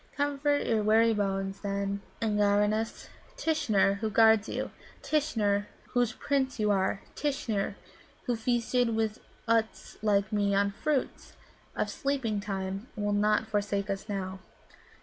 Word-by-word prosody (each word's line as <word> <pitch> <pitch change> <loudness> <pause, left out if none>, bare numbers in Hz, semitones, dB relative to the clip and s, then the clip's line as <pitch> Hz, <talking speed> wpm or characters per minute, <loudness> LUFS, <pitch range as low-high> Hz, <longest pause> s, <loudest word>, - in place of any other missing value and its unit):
Comfort 285 0 +1
your 225 -2 +2
weary 225 +2 +4
bones, 195 -1 -2
then, 200 0 -2 0.2
Eengenares. 210 +1 +1 0.3
Tishnar, 215 -11 +2
who 220 0 -1
guards 220 0 +5
you, - - -3 0.3
Tishnar, 210 -9 +1 0.2
whose 245 -2 +1
Prince 265 -2 -1
you 210 -1 +2
are, 195 0 0
Tishnar, 260 -10 -1 0.5
who 245 - 0
feasted 240 +2 +1
even 220 -1 +1 0.4
Utts 225 -1 0
like 210 0 +1
me 200 -1 +2
on 200 0 +2
fruits 285 +6 -2 0.4
of - - 0
sleeping 265 -7 -1
time, 195 +1 -4
will 205 -1 -1
not 210 +2 +2
forsake 205 -2 -1
us 195 +2 -5
now." 190 -1 -3
215 Hz, 130 wpm, -29 LUFS, 200-235 Hz, 0.5 s, guards